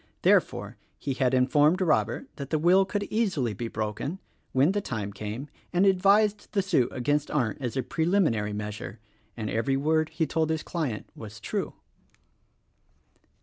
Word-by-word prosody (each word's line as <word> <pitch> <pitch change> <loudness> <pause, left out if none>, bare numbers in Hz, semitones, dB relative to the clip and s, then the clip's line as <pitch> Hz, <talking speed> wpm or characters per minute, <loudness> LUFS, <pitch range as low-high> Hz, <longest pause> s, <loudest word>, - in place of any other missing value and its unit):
Therefore - - +2 0.2
he 140 - -3
had 130 -1 +1
informed 145 +7 +4
Robert 120 - +1
that 140 -2 -6
the 155 - +1
will 180 +5 +5
could 205 +1 -2
easily 180 - 0
be 115 +4 -4
broken, 110 - -3 0.3
when 135 +6 +4
the 205 +1 -1
time 105 - -4
came, 105 +7 -5 0.2
and 180 +2 +3
advised 200 +2 +3
the 200 -2 +2
suit 165 -11 +2
against 145 +4 0
Arndt 125 -4 -1
as 125 0 -3
a 130 - +1
preliminary 160 - +1
measure: 105 +1 -6 0.4
and 110 -2 -3
every 135 +6 0
word 155 +2 +1
he 165 - -1
told 160 0 0
his 160 -1 -1
client 150 -11 -3
was 110 0 -9
true. 110 - -3
140 Hz, 155 wpm, -27 LUFS, 115-175 Hz, 0.4 s, will